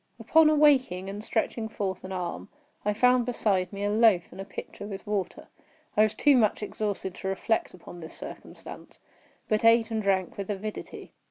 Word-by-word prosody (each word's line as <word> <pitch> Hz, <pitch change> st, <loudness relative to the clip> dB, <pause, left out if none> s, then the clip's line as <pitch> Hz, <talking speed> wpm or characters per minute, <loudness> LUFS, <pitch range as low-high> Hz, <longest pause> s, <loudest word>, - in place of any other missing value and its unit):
Upon 320 Hz, -1 st, +5 dB
awaking, 260 Hz, -11 st, +3 dB
and 205 Hz, +1 st, -7 dB
stretching 220 Hz, 0 st, -2 dB
forth 190 Hz, -3 st, -4 dB
an 185 Hz, -, -7 dB
arm, 180 Hz, -2 st, -4 dB, 0.3 s
I 210 Hz, -, +1 dB
found 250 Hz, +3 st, +3 dB
beside 200 Hz, -6 st, 0 dB
me 200 Hz, 0 st, -5 dB
a 205 Hz, -, +1 dB
loaf 215 Hz, -5 st, +4 dB
and 195 Hz, -, -8 dB
a -, -, -7 dB
pitcher 205 Hz, +1 st, -8 dB
with 195 Hz, -2 st, -7 dB
water. 205 Hz, -3 st, -3 dB, 0.5 s
I 210 Hz, -, +4 dB
was 215 Hz, -1 st, +3 dB
too 290 Hz, -2 st, +4 dB
much 215 Hz, -3 st, +2 dB
exhausted 205 Hz, -3 st, -3 dB
to 190 Hz, -, -7 dB
reflect 195 Hz, +2 st, -1 dB
upon 175 Hz, 0 st, -12 dB
this 160 Hz, -1 st, -8 dB
circumstance, -, -, -10 dB, 0.5 s
but 215 Hz, 0 st, 0 dB
ate 230 Hz, 0 st, +5 dB
and 220 Hz, -1 st, -1 dB
drank 190 Hz, -3 st, 0 dB
with 200 Hz, 0 st, -5 dB
avidity. 210 Hz, +1 st, -6 dB
210 Hz, 180 wpm, -27 LUFS, 190-230 Hz, 0.5 s, Upon